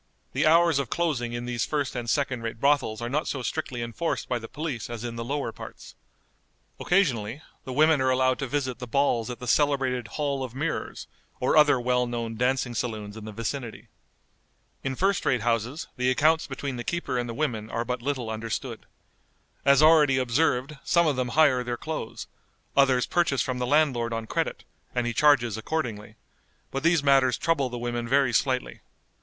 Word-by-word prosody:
The - - +2
hours 165 -2 +5
of 135 -5 -3
closing 135 -9 -1
in 120 0 -4
these 120 -2 -1
first 145 -4 -2
and 120 -1 -3
second 135 -4 0
rate 115 0 -5
brothels 140 -5 +1
are - - -2
not 150 +5 -1
so 130 -3 -3
strictly 130 -4 -3
enforced 130 +3 -3
by 125 - -1
the 115 - -8
police 145 -7 -5
as 120 -1 -6
in 120 -1 -4
the 115 - -4
lower 140 -1 -2
parts. - - -11 0.9
Occasionally 140 - +1 0.2
the 130 - -5
women 155 +1 +4
are 130 - +2
allowed 130 0 +2
to 135 - -2
visit 130 -2 -2
the 125 - -6
balls 120 -2 +1
at 125 - -5
the 125 - -8
celebrated 130 -3 +1
Hall 140 -3 -1
of 125 -1 -7
Mirrors, 150 +4 -3 0.3
or 125 - +1
other 150 -3 +6
well 125 0 +1
known 115 -1 -4
dancing 125 +1 0
saloons 110 -3 -4
in 110 -1 -9
the 110 - -6
vicinity. 115 -1 -5 0.9
In 135 -1 -2
first 195 +5 +1
rate 125 -3 +1
houses 120 +5 -1
the 125 0 +1
accounts 155 +5 +3
between 135 -1 -5
the 120 - -4
keeper 170 -6 -2
and 120 0 -3
the 115 - -5
women 115 -7 -2
are 115 +1 -2
but 125 0 -3
little 130 -4 -2
understood. 115 +2 -5 0.8
As 140 +2 +5
already 155 -4 +6
observed, 130 +2 +1
some 170 0 +3
of 150 -3 +2
them 130 -1 -1
hire 135 -6 +5
their 120 -1 -3
clothes; 155 -5 -5 0.5
others 135 -3 +4
purchase 170 -6 +1
from 125 -1 -3
the 125 - -1
landlord 130 -6 +2
on 115 0 -3
credit, - - -2 0.3
and 125 -1 +1
he 120 - -1
charges 120 -4 +3
accordingly; 110 -5 -4 0.6
but 135 - -2
these 170 -2 +3
matters 135 -3 +4
trouble 150 -6 +1
the 120 - -5
women 120 0 -3
very 135 -1 +3
slightly. 130 +1 0
130 Hz, 190 wpm, -26 LUFS, 120-145 Hz, 0.9 s, other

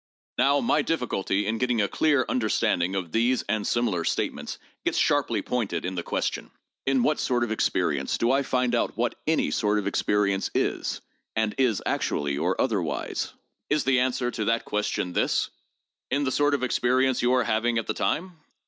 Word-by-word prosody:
Now, 140 +1 +4
my 235 0 +2
difficulty 105 -9 -1
in 110 +2 -1
getting 125 -2 +1
a 100 - +2
clear 145 0 +2
understanding 95 -6 +1
of 90 -4 -3
these 120 +5 +2
and 105 0 -1
similar 110 -8 0
statements - - -2 0.3
gets - - 0
sharply - - +2
pointed 100 -10 -2
in 95 - -2
the 90 - -2
question: - - -2 0.4
In 135 -2 +3
what 150 - +2
sort 120 -1 +1
of 120 - -2
experience 110 - 0
do 115 +1 +2
I 135 +1 +3
find 125 -2 0
out 120 - 0
what 120 +1 0
any 160 0 +2
sort 105 -3 +1
of 105 - -1
experience 100 -1 +1
is, - - -1 0.3
and 110 -1 +1
is 125 -6 +2
actually 70 -1 -1
or - - -1
otherwise? - - -1 0.4
Is 150 0 +2
the 130 -1 +3
answer 125 -1 0
to 110 - -3
that 115 +1 +1
question 105 -3 -2
this: - - +1 0.6
In 140 +2 +1
the 130 - 0
sort 145 +1 +2
of 135 - -3
experience 130 +1 +2
you 125 +1 +3
are 125 -1 +3
having 115 +1 +1
at 115 - -1
the - - -1
time 175 +1 -2
120 Hz, 185 wpm, -26 LUFS, 105-130 Hz, 0.6 s, Now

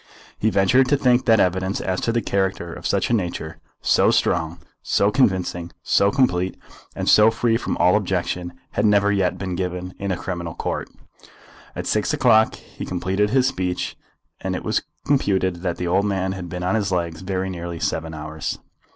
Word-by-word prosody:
He 110 - +2
ventured 120 +7 +3
to 145 - +4
think 125 -2 +3
that 115 -2 +5
evidence 95 +2 +1
as 95 0 -2
to 115 - 0
the 115 -1 0
character 95 -4 -1
of - - -5
such - - 0
a - - +3
nature, 85 -6 -2 0.2
so - - +4
strong, 80 0 +1 0.2
so 100 +1 +2
convincing, 95 -8 +1
so 100 - +3
complete, 95 -7 +1 0.4
and - - -3
so 105 +1 +7
free 115 0 +1
from 115 - -2
all 90 +2 +4
objection, 90 -3 -1 0.2
had - - -1
never 105 -1 +4
yet 95 -3 +1
been 95 -1 -4
given 90 0 -3
in 100 -1 -2
a 90 - -1
criminal 85 -3 -5
court. - - -3 0.9
At - - -4
six - - +1
o'clock 110 -2 +4
he - - -11
completed 95 +3 0
his 130 +2 +3
speech, 95 -9 -2 0.4
and - - -3
it - - -5
was - - +1 0.2
computed 95 -10 +1
that 85 -1 -3
the 90 - -3
old 95 +4 +2
man 95 -2 0
had 90 -2 -6
been 90 0 -5
on 90 - 0
his 105 -3 0
legs 85 -3 -2
very 95 0 -2
nearly 85 -1 -6
seven 80 -4 -2
hours. 75 0 -5
95 Hz, 185 wpm, -22 LUFS, 90-105 Hz, 0.9 s, so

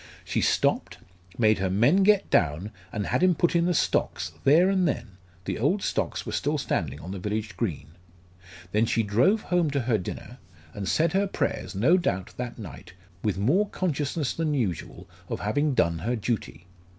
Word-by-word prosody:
She - - -1
stopped, - - +1 0.4
made 110 -3 +3
her 95 -1 0
men 120 - +4
get 200 0 +4
down 80 +6 +1 0.2
and 105 -2 -3
had - - 0
him 180 -1 +4
put 175 +1 +1
in 170 0 +3
the 180 - +2
stocks 80 - 0
there 160 +7 +6
and 190 -2 +2
then 120 -7 -2 0.4
the - - -3
old 170 - +1
stocks - - -2
were - - -4
still 150 +2 0
standing 75 - -2
on 85 +4 -8
the 95 - -5
village 105 +3 -3
green. 85 -9 -3 0.8
Then 110 +3 +2
she 115 - +1
drove 125 - +3
home 175 -3 +1
to 140 -1 0
her 120 -3 +1
dinner, 120 +7 -7 0.3
and 100 -2 -4
said 165 +1 +2
her 200 +1 +2
prayers 100 - -2
no 130 - +4
doubt 95 - -2
that 125 -1 -5
night 95 - -10 0.3
with 105 -4 -1
more 170 - +2
consciousness 150 -5 -1
than 155 -2 -1
usual 105 - -3 0.2
of - - -3
having 145 +7 0
done 85 -7 +2
her 120 +9 -1
duty. 105 - -3
120 Hz, 185 wpm, -26 LUFS, 100-165 Hz, 0.8 s, there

